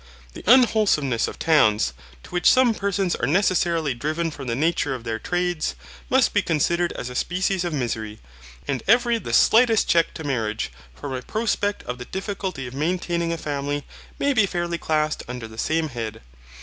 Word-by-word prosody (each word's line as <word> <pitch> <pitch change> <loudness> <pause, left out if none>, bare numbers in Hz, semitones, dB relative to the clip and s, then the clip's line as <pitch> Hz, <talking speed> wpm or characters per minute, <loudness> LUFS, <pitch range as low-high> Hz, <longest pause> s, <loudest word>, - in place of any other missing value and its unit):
The - - -10
unwholesomeness 210 - +4
of - - -7
towns, 110 - +3 0.3
to - - -14
which 180 0 +4
some 255 -3 +4
persons 195 -3 -1
are 120 - -1
necessarily 170 -3 +2
driven 155 +6 -2
from 140 -3 -8
the 115 - -1
nature 150 -1 0
of 120 - -8
their 115 -1 -3
trades, 175 - -1 0.3
must - - +3
be - - +3
considered 170 +3 +1
as 125 - -6
a - - -7
species 185 +6 0
of 175 - -2
misery, 110 -6 -3 0.5
and 135 -3 -1
every 235 +1 +4
the - - -6
slightest 225 -1 +4
check 165 -1 +3
to 160 - -6
marriage, 110 - -2 0.2
from 65 - -6
a 130 - -3
prospect 205 - -1
of 125 0 -5
the 125 - -6
difficulty 190 - -4
of 125 - -8
maintaining 170 +3 -1
a 170 - -2
family, 145 -1 -3 0.3
may 285 0 +1
be 220 -5 +3
fairly 175 -1 -2
classed 155 -1 0
under 125 -2 -6
the 110 0 -11
same 160 +3 0
head. 115 - -6
160 Hz, 180 wpm, -23 LUFS, 125-185 Hz, 0.5 s, unwholesomeness